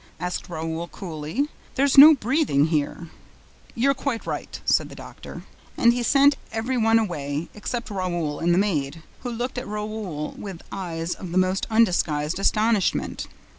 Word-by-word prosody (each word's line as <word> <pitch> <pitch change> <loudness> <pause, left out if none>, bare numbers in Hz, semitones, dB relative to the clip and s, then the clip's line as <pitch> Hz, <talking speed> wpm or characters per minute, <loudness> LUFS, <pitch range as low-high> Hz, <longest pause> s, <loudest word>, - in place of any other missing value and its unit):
asked 180 0 -4
Raoul 165 0 -4
coolly. 170 - -4 0.3
"There's 275 0 +2
no 300 +3 +11
breathing 250 - +2
here." 155 +2 -2 0.7
"You're 275 +4 +3
quite 265 -3 -3
right," - - -5
said - - +2
the - - -11
doctor. - - -10 0.3
And 235 0 +5
he 245 - -2
sent 280 +3 +4
every 225 +4 -2
one 225 -1 +4
away, 155 -7 -2
except 230 +2 -5
Raoul 175 -6 -2
and 170 +1 +1
the 175 - +3
maid, 160 -6 -1 0.2
who 250 - -5
looked 245 +2 -3
at 250 - -8
Raoul 210 -7 -4
with 195 -5 -8
eyes 170 -3 -3
of 180 -3 -8
the 180 - -1
most 185 +1 +1
undisguised 175 -8 +1
astonishment. 215 -1 +1
195 Hz, 155 wpm, -24 LUFS, 165-235 Hz, 0.7 s, no